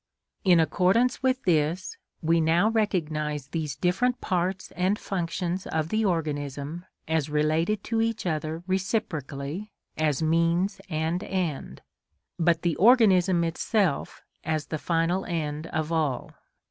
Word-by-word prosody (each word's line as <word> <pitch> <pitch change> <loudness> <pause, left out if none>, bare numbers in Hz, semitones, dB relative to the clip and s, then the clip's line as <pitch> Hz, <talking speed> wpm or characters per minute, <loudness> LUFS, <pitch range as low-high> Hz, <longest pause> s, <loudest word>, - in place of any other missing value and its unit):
In 180 -4 +5
accordance 185 - +2
with 260 0 +1
this, 165 +1 +1 0.3
we 165 +1 +3
now 170 +6 +3
recognise 155 - -1
these 155 -4 -3
different 240 - +1
parts 185 -1 -2
and 185 +3 0
functions 180 -1 -3
of 160 0 -1
the 220 +3 +1
organism 150 -2 -2 0.2
as 160 -2 0
related 155 +7 +1
to 225 -1 0
each 225 -2 -1
other 160 0 -2
reciprocally 185 - -2 0.3
as 155 -1 +1
means 170 +5 +1
and 160 +3 -1
end, 180 -8 -3 0.6
but 165 -1 +2
the 170 -3 +1
organism 190 -6 +5
itself 170 0 -1 0.2
as 155 -1 -1
the 155 - -1
final 170 +4 0
end 155 -2 -3
of 155 0 -2
all. 155 -6 -1
170 Hz, 125 wpm, -26 LUFS, 155-190 Hz, 0.6 s, In